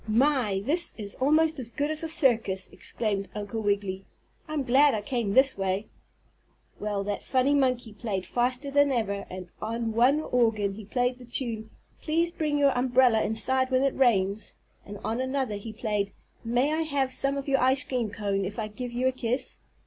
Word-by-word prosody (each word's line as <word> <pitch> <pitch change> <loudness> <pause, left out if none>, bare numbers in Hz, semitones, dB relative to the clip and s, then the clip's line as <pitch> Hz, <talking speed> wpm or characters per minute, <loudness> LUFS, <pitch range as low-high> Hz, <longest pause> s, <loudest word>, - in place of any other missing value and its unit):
"My! 225 -4 +2
This 335 +6 0
is 205 -3 -6
almost 310 +2 +3
as 240 -3 -2
good 290 +5 -1
as 310 - 0
a 325 - -3
circus!" 230 - +2
exclaimed 200 -4 -3
Uncle 210 +2 -4
Wiggily. 200 -2 -1 0.4
"I'm 305 -2 -2
glad 270 +2 +5
I 210 - -3
came 235 -5 -1
this 265 -5 +4
way." 195 +2 -1 0.9
Well, 205 -1 -2
that 205 0 -3
funny 260 +2 +2
monkey 250 -5 +1
played 200 -3 -3
faster 255 +3 -1
than 285 0 +4
ever, 200 -5 -1
and 185 -1 -8
on 230 0 -2
one 250 +6 +4
organ 225 -8 +1
he 210 +1 -9
played 245 +3 0
the 250 - -11
tune 230 -3 -4 0.3
"Please 335 +2 +1
Bring 305 -3 -1
Your 280 -2 +3
Umbrella 245 -2 +4
Inside 260 +4 +1
When 260 0 +2
it 275 - +1
Rains," 210 -5 +1 0.3
and 205 0 -7
on 230 +3 -1
another 260 -5 -1
he 220 +2 -7
played 210 -3 -2 0.3
"May 245 +6 +1
I 320 - 0
Have 280 -4 0
Some 275 +1 0
of 275 - -5
Your 270 -1 +3
Ice 260 +3 +3
Cream 250 -6 -2
Cone 200 -1 -2
if 195 +2 -5
I 215 -2 -3
Give 245 +3 -6
You 245 +2 0
a - - +3
Kiss?" 250 0 -3
245 Hz, 185 wpm, -27 LUFS, 210-270 Hz, 0.9 s, glad